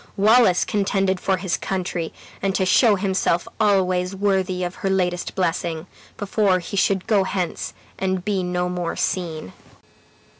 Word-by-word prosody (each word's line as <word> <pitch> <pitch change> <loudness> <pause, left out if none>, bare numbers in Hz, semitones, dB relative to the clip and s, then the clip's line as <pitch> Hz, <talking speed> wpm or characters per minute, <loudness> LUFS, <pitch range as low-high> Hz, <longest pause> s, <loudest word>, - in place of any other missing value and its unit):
Wallace 210 -2 +5
contended 195 -2 0
for 190 0 +1
his 185 -1 -1
country, 180 -3 -3 0.3
and 195 -1 0
to 190 - +1
show 210 +4 +5
himself 190 -3 0
always 185 -3 +2
worthy 190 -2 0
of 175 0 -3
her 195 - 0
latest 180 -2 -1
blessing 170 -2 -1 0.3
"before 205 -2 +2
he 180 +2 -6
should 195 -1 +1
go 205 -3 +3
hence 185 -2 -3 0.2
and 190 -1 -1
be 200 -3 0
no 180 0 -1
more 180 -1 -3
seen." 160 - -3
185 Hz, 145 wpm, -22 LUFS, 180-195 Hz, 0.3 s, Wallace